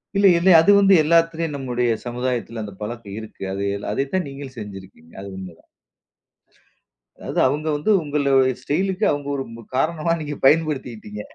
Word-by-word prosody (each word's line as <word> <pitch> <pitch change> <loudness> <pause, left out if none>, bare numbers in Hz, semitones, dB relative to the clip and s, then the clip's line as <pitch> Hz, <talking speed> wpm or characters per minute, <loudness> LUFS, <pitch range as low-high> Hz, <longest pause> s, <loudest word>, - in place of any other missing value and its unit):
இல்ல 200 0 +5
இல்ல 180 +3 +3
அது 165 +5 +5
வந்து 195 -1 +5
எல்லாத்திலயும் 165 -1 +2
நம்முடைய 125 -3 -1
சமுதாயத்தில 120 -2 -3
அந்த 100 -2 -8
பழக்கம் 105 -2 -6
இருக்கு, 110 -2 -10 0.5
அதை 110 - 0
தான் 185 -1 0
நீங்க 140 +1 -8
செஞ்சுருக்கீங்க, 95 -6 -10
அது 100 - -8
உண்மைதான். 90 -3 -11 1.5
அதாது - - -3
அவங்க 150 +4 -2
வந்து 150 +9 0
உங்களோட 140 -2 +2 0.2
ஸ்டைலுக்கு 190 +9 -1
அவங்க 145 -1 -3
ஒரு 135 - -2
மு 115 - -11
காரணமா 160 +3 0
நீங்க 150 -1 -5
பயன்படுத்திகிட்டிங்க. 130 -9 0
135 Hz, 145 wpm, -22 LUFS, 115-160 Hz, 1.5 s, இல்ல